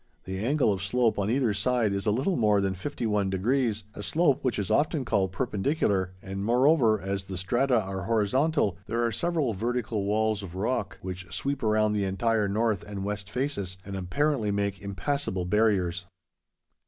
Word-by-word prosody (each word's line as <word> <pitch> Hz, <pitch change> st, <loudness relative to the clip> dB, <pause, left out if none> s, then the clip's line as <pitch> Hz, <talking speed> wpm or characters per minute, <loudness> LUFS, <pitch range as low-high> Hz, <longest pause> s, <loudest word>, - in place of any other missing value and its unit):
The 95 Hz, 0 st, -5 dB
angle 135 Hz, -3 st, +2 dB
of 95 Hz, -, -4 dB
slope 115 Hz, +3 st, +1 dB
on 100 Hz, +1 st, 0 dB
either 120 Hz, -3 st, +2 dB
side 110 Hz, +1 st, +1 dB
is 100 Hz, +2 st, -2 dB
a -, -, +4 dB
little 135 Hz, -, +1 dB
more 105 Hz, -3 st, +3 dB
than 95 Hz, -1 st, 0 dB
fifty 115 Hz, +7 st, -4 dB
one 105 Hz, -3 st, +1 dB
degrees, 110 Hz, +2 st, 0 dB
a -, -, -7 dB
slope 150 Hz, +5 st, +2 dB
which 130 Hz, -3 st, 0 dB
is 100 Hz, -3 st, -2 dB
often 150 Hz, -2 st, +2 dB
called 100 Hz, -5 st, +1 dB
perpendicular, 100 Hz, -, 0 dB
and, 95 Hz, +1 st, -4 dB
moreover, 120 Hz, -1 st, +4 dB
as 95 Hz, 0 st, -3 dB
the 95 Hz, -1 st, -6 dB
strata 120 Hz, +7 st, +2 dB
are 95 Hz, -3 st, -4 dB
horizontal, 115 Hz, -, +1 dB
there 120 Hz, +1 st, 0 dB
are 115 Hz, -, 0 dB
several 155 Hz, -1 st, 0 dB
vertical 115 Hz, -1 st, -2 dB
walls 110 Hz, 0 st, +1 dB
of 90 Hz, -3 st, -8 dB
rock, 110 Hz, +7 st, -2 dB
which 95 Hz, -1 st, -6 dB
sweep 140 Hz, +9 st, -2 dB
around 110 Hz, -1 st, +2 dB
the 100 Hz, -2 st, 0 dB
entire 105 Hz, +3 st, +1 dB
north 110 Hz, 0 st, +1 dB
and 100 Hz, -2 st, -6 dB
west 105 Hz, -1 st, -4 dB
faces, 100 Hz, -9 st, -2 dB
and 100 Hz, 0 st, -6 dB
apparently 110 Hz, +6 st, 0 dB
make 100 Hz, -1 st, -1 dB
impassable 100 Hz, +1 st, -2 dB
barriers. 90 Hz, -3 st, +1 dB
105 Hz, 180 wpm, -27 LUFS, 95-125 Hz, -, a